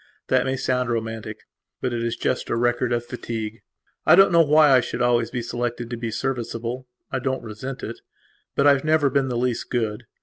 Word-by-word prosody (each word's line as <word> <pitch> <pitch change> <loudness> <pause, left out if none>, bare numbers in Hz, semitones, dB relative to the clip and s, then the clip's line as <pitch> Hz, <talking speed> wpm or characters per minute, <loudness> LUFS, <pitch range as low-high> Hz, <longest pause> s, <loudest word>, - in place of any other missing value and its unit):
That - - +3
may 130 0 0
sound 125 -1 0
romanticbut 110 -2 -3 0.6
it 115 -1 -2
is 115 0 -1
just 130 - -2
a - - +1
record 120 +1 +1
of 120 0 0
fatigue. 115 -2 -5 0.4
I - - +7
don't 195 +1 +6
know 170 -1 +6
why 150 -1 +5
I 130 - +7
should 120 - -5
always 120 -1 +2
be 120 -1 -3
selected 120 0 -3
to - - -2
be 115 0 -4
serviceable. 120 0 -3 0.2
I 135 - -1
don't 130 +1 -2
resent 120 +5 -6
itbut 115 +4 -6
I 145 - +8
have 135 - -1
never 155 -3 +3
been 135 0 +2
the 125 -2 -2
least 125 -1 -1
good. 110 -1 -2
120 Hz, 200 wpm, -23 LUFS, 115-130 Hz, 0.6 s, I